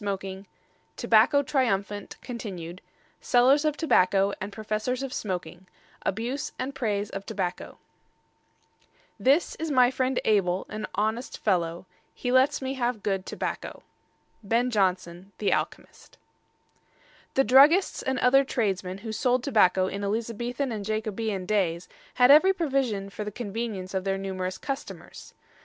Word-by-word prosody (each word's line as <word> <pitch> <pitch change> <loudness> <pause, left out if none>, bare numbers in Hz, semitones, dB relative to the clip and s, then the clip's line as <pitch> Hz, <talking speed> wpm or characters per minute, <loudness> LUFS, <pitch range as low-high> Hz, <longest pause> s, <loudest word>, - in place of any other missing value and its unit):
III 195 -1 -4 0.5
TOBACCO 260 +6 +4
TRIUMPHANT 205 -7 -1
(continued) 185 -8 -7 0.4
SELLERS 265 +4 +4
OF 300 -1 0
TOBACCO 195 - +3
AND 195 +2 -4
PROFESSORS 215 +5 -3
OF 265 -1 -5
SMOKING 185 -2 -5 0.4
ABUSE 245 +8 -3
AND 265 +2 -4
PRAISE 210 -6 -2
OF 195 - -5
TOBACCO 190 -4 -4 1.4
This 280 +6 +3
is 320 0 -3
my 255 -3 +4
friend 260 0 0
Abel, 190 -4 +2
an 215 0 -5
honest 220 +4 -2
fellow; 175 -3 -1 0.3
He 245 - -3
lets 260 +1 +3
me 265 0 -2
have 245 -4 -2
good 195 -2 -2
tobacco. - - -5 0.6
BEN 230 +4 +1
JONSON, 185 -2 -1
The 205 - +1
Alchemist. - - -5 1.2
The 270 - +4
druggists 285 - +5
and 265 0 -1
other 270 +2 +5
tradesmen 195 -7 -2
who 220 - -3
sold 250 +3 +1
tobacco 190 -8 +3
in 200 +2 -4
Elizabethan 235 +5 -2
and 215 -3 -4
Jacobean 215 -2 -3
days 180 -4 0 0.3
had 250 +1 +6
every 370 +7 +7
provision 265 - -1
for 205 +3 -5
the 210 - -5
convenience 205 -3 -5
of 190 -1 -1
their 195 0 -1
numerous 185 -1 -4
customers. 275 -1 -7
215 Hz, 135 wpm, -26 LUFS, 195-255 Hz, 1.4 s, every